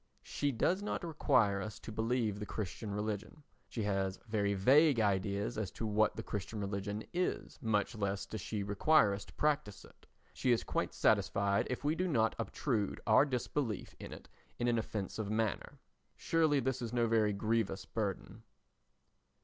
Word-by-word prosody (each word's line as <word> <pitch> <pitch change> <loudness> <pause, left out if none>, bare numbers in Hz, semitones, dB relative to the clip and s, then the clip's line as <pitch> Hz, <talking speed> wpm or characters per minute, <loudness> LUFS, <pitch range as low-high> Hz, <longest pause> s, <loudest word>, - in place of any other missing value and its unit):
She 145 -1 -1
does 175 - +1
not 205 - -3
require 125 -11 +2
us 105 +1 -6
to 115 - -9
believe 110 -1 0
the 105 - -4
Christian 105 +1 -4
religion, 105 +6 -4 0.3
she 115 - -3
has 95 -2 0
very 100 -2 +1
vague 135 +7 +5
ideas 100 +1 0
as 105 -4 -2
to 115 - -4
what 110 0 +2
the - - -5
Christian 105 +2 -4
religion 100 +1 -3
is, 180 +1 -2
much 110 -1 +1
less 100 -2 -2
does 110 +1 -6
she 105 +2 -3
require 105 +3 +4
us 100 0 -5
to - - -16
practise 150 -9 -1
it. - - -20 0.3
She 125 - +1
is 120 - +2
quite - - -2
satisfied 100 0 +2
if 125 - -3
we 150 +2 +2
do 185 +3 -1
not 115 -9 +2
obtrude 110 -8 -1
our 110 +5 +6
disbelief 125 -4 -2
in - - -8
it - - -10 0.3
in 120 - 0
an 120 -1 +2
offensive 105 -1 -4
manner. 110 -2 -1 0.4
Surely 160 -3 +2
this 130 0 -1
is 115 -2 -3
no 120 -1 +2
very 110 -2 +3
grievous 105 -1 -1
burden. 105 0 -4
110 Hz, 170 wpm, -34 LUFS, 100-125 Hz, 0.4 s, our